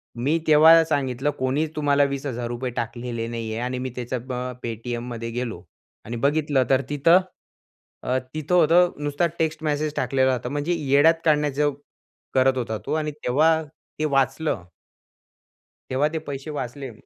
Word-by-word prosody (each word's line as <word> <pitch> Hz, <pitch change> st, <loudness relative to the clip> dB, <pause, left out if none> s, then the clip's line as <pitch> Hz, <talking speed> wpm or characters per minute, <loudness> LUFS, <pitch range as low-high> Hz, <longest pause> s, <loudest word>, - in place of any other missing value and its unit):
मी 135 Hz, +7 st, +1 dB
तेव्हा 160 Hz, +2 st, +8 dB
सांगितलं 140 Hz, -3 st, -1 dB
कोणी 130 Hz, +4 st, +1 dB
तुम्हाला 145 Hz, -1 st, +3 dB
₹20,000 125 Hz, -2 st, -3 dB
टाकलेले 120 Hz, -1 st, -4 dB
नाहीये 115 Hz, -1 st, -4 dB
आणि 125 Hz, +1 st, -2 dB
मी 130 Hz, +1 st, -3 dB
त्याच्या 125 Hz, +1 st, -3 dB
अ, 125 Hz, +1 st, -5 dB
पे-टी-एममध्ये 120 Hz, 0 st, -5 dB
गेलो. 115 Hz, -7 st, -4 dB, 0.4 s
आणि 115 Hz, -, -5 dB
बघितलं 145 Hz, -2 st, +2 dB
तर 135 Hz, 0 st, +4 dB
तिथं 165 Hz, +5 st, +5 dB, 0.8 s
अ, 125 Hz, -, 0 dB, 0.2 s
तिथं 155 Hz, +3 st, -1 dB
होतं 175 Hz, +1 st, +5 dB
नुसता 145 Hz, +3 st, 0 dB
टेक्स्ट 160 Hz, -1 st, -1 dB
मेसेज 150 Hz, 0 st, -1 dB
टाकलेला 130 Hz, 0 st, +2 dB
होता. 125 Hz, 0 st, -3 dB
म्हणजे 145 Hz, +5 st, -1 dB
येड्यात 145 Hz, +2 st, +4 dB
काढण्याचं 150 Hz, -1 st, +2 dB, 0.6 s
करत 130 Hz, 0 st, +3 dB
होता 110 Hz, -3 st, -2 dB
तो -, -, -2 dB
आणि 155 Hz, -1 st, -1 dB
तेव्हा 150 Hz, +3 st, +2 dB, 0.4 s
ते 155 Hz, -, +1 dB
वाचलं. 135 Hz, -, 0 dB, 1.3 s
तेव्हा 140 Hz, +3 st, +2 dB
ते -, -, 0 dB
पैसे 140 Hz, +2 st, -6 dB
वाचले. 130 Hz, +1 st, -6 dB
135 Hz, 140 wpm, -24 LUFS, 125-150 Hz, 1.3 s, तेव्हा